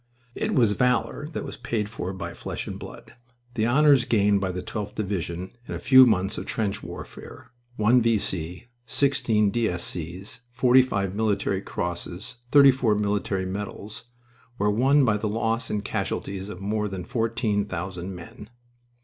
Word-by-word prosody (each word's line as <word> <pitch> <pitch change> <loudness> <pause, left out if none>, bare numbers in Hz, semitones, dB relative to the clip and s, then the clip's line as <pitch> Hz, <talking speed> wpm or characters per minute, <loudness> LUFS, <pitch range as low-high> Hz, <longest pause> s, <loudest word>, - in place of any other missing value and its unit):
It - - -2
was 115 -5 +4
valor 125 +6 +1
that - - -4
was - - -7
paid 115 -3 -2
for 100 -4 -5
by 95 - -6
flesh - - -5
and - - -6
blood. - - -11 0.4
The 110 -1 +1
honors 140 0 +5
gained 100 -2 +3
by 95 -1 -1
the 90 0 -5
12th 105 -2 -5
Division 95 -3 -3 0.2
in - - -4
a - - -4
few 130 0 +8
months 95 -3 +1
of - - -7
trench 105 -2 -2
warfare 115 - -10 0.2
one 120 +3 +4
V. 115 -1 +3
C., 90 +1 -4 0.2
sixteen 110 -5 +2
D. 115 +1 +1
S. 90 -1 -3
C.'s, 90 +6 -6
forty 125 +1 +5
five 100 -7 -1
Military 100 -2 0
Crosses, 90 +5 -5
thirty 140 -1 +8
four 125 -5 +1
Military 100 -2 -1
Medals 100 +3 -6 0.5
were 105 -1 +2
won 135 +6 +4
by 110 -3 +2
the 105 0 -2
loss 115 +2 -1
in 105 - -1
casualties 100 -1 -3
of 90 - -7
more 105 +2 -1
than 95 -3 -5
fourteen 115 -3 0
thousand 90 0 -5
men. 90 +4 -11
105 Hz, 165 wpm, -25 LUFS, 95-120 Hz, 0.5 s, few